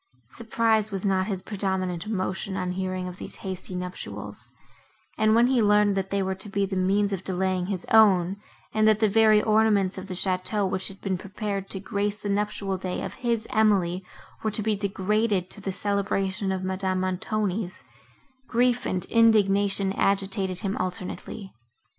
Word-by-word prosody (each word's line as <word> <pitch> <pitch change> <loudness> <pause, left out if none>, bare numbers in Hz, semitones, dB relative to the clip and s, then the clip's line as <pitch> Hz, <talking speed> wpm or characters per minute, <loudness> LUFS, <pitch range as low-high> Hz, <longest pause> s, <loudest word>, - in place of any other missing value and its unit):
Surprise 225 -1 +1
was 195 -1 -4
not 190 -1 +1
his 190 -3 -3
predominant 190 -3 -2
emotion 190 -1 -2
on 180 -1 -2
hearing 185 0 -3
of 180 0 -8
these - - -8
hasty 185 -1 -4
nuptials; 180 0 -7 0.6
and, 215 0 +3
when 235 +1 +5
he 250 -1 +3
learned, 210 -1 +4
that 195 0 -2
they 200 -1 0
were 190 0 -1
to 190 +2 -8
be 200 0 0
the 195 0 -4
means 200 +2 +1
of 190 -1 -3
delaying 185 -1 -1
his 190 -3 -3
own, 195 -4 +5 0.4
and 215 0 +3
that 215 -1 +4
the 215 - +4
very 215 0 +5
ornaments 215 -3 +2
of 190 - -9
the 185 - -5
château, 190 +2 0
which 190 0 0
had 195 - -5
been 190 -3 -2
prepared 200 0 -4
to 190 - -3
grace 205 +2 -3
the 205 - -2
nuptial 200 -1 -1
day 185 -1 -3
of - - -5
his 235 -3 -1
Emily, 195 -4 +2 0.4
were 220 - 0
to 215 0 -1
be 215 0 +1
degraded 200 -1 0
to 205 - -7
the 195 - -3
celebration 195 0 -1
of 190 -1 -2
Madame 185 0 -1
Montoni's, 185 +1 -2 0.6
grief 245 +1 +2
and 185 -1 -1
indignation 200 -3 +3
agitated 195 -2 0
him 195 0 -2
alternately. 185 +2 -4
195 Hz, 170 wpm, -26 LUFS, 185-210 Hz, 0.6 s, when